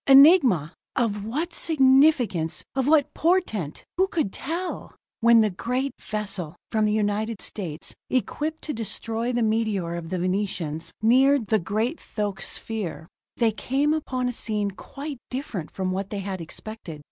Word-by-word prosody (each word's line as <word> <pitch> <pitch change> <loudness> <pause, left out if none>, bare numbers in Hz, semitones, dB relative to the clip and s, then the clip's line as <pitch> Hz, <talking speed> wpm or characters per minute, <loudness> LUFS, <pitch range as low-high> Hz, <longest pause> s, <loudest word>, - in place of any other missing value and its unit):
Enigma! 270 - +7 0.2
Of 210 -5 0
what 310 +10 -2
significance, 265 - +3
of 265 -1 +1
what 300 -2 +4
portent 310 - 0
who 380 +1 +4
could 315 - -1
tell? 345 +5 -4 0.2
When 235 -1 +6
the 215 -2 +2
great 250 +8 -2
vessel 195 -6 -3 0.2
from 215 -1 +2
the 210 - +2 0.2
United 215 +1 -2
States, 165 -7 -5 0.2
equipped 300 +5 -1
to 300 - -3
destroy 225 +2 -2
the 240 -1 +1
meteor 215 -6 0
of 170 -1 -5
the 185 - -1
Venetians, 180 -4 -1
neared 260 +2 +5
the 215 +1 +2
great 220 - -1
thoque 205 -3 -3
sphere, 195 -7 -3 0.3
they 230 -2 +3
came 275 +7 +1
upon 255 -5 -1
a 245 - -1
scene 210 -3 -1
quite 275 +7 -7
different 245 - -4
from 185 -1 -2
what 195 +1 -2
they 205 - -3
had 190 -2 -4
expected. 170 -1 -7
220 Hz, 150 wpm, -25 LUFS, 195-270 Hz, 0.3 s, Enigma